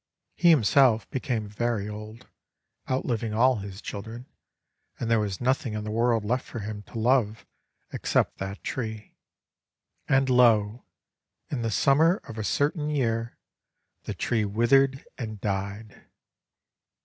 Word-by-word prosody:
He 175 - +4
himself 130 -5 +4
became 125 -5 -2
very 105 0 -2
old, 105 +3 -9 0.3
— - - -27
outliving 115 -4 -1
all 125 +2 +4
his 100 -1 -8
children; 115 +4 -7 0.7
and 115 - -2
there 115 - +4
was 100 -3 -2
nothing 130 -1 0
in 105 - -3
the 105 - -4
world 115 -1 +1
left 125 +4 0
for - - -9
him 105 0 -6
to - - -9
love 115 -2 +1 0.5
except - - 0
that 95 +1 -6
tree. 110 -4 -5 1.0
And 135 0 +3
lo! 120 -3 +3 0.7
in 135 -5 -2
the 115 - -1
summer 150 - +4
of 115 -1 -7
a - - -2
certain 150 - 0
year, 115 -5 -1 0.7
the - - -4
tree 115 -3 0
withered 130 +6 +2
and 110 -4 -5
died! 100 +2 -4
115 Hz, 135 wpm, -26 LUFS, 105-130 Hz, 1.0 s, He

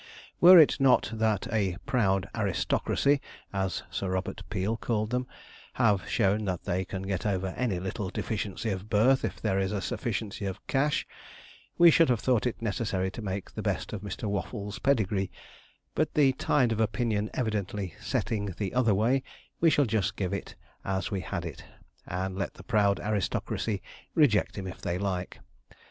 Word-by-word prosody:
Were 180 +1 +10
it 155 -2 +6
not 135 -4 +4
that 110 -3 +1
a 95 -5 +1
'proud 95 -7 +1
aristocracy,' 115 +7 +1 0.3
as 95 -1 -1
Sir 95 - -2
Robert 95 +2 -2
Peel 100 +2 -1
called 110 -1 -1
them, 125 0 -1 0.5
have 105 -8 +2
shown 105 0 +2
that 90 -3 -2
they 95 +2 -1
can 95 +1 -5
get 95 -2 -2
over 95 -2 0
any 100 -2 -1
little 95 +1 -3
deficiency 105 +1 -3
of 95 +2 -5
birth 120 +6 +4
if - - -3
there 95 -3 0
is 95 +2 0
sufficiency 105 -2 -3
of 95 - -6
cash, 140 +2 +1 0.7
we 170 -1 +8
should 165 -1 +5
have 120 -3 +2
thought 120 +3 +2
it 115 - -4
necessary 95 -3 -1
to 115 - -7
make 100 -2 -4
the - - -5
best - - -2
of 105 - -4
Mr. 100 -3 -6
Waffles' 100 0 -4
pedigree, 105 -8 +1 0.6
but 155 0 0
the 140 -3 +5
tide 130 -2 +2
of 110 - -1
opinion 110 -1 0
evidently 105 -5 -2
setting 100 -4 -2
the 100 -3 -3
other 120 -5 +3
way, 120 +7 +2 0.4
we 165 - +5
shall 145 -2 +3
just 110 -5 0
give 95 -3 -2
it - - -5 0.3
as 95 -2 -2
we 95 -2 -1
had - - -4
it, - - -7 0.4
and 95 +1 -3
let 95 - -3
the - - -12
proud 100 -3 +2
aristocracy 105 0 -1 0.3
reject 130 -12 +3
him 95 - -4
if 90 - -7
they 85 - -1
like. 95 -2 -3
105 Hz, 170 wpm, -28 LUFS, 95-115 Hz, 0.7 s, Were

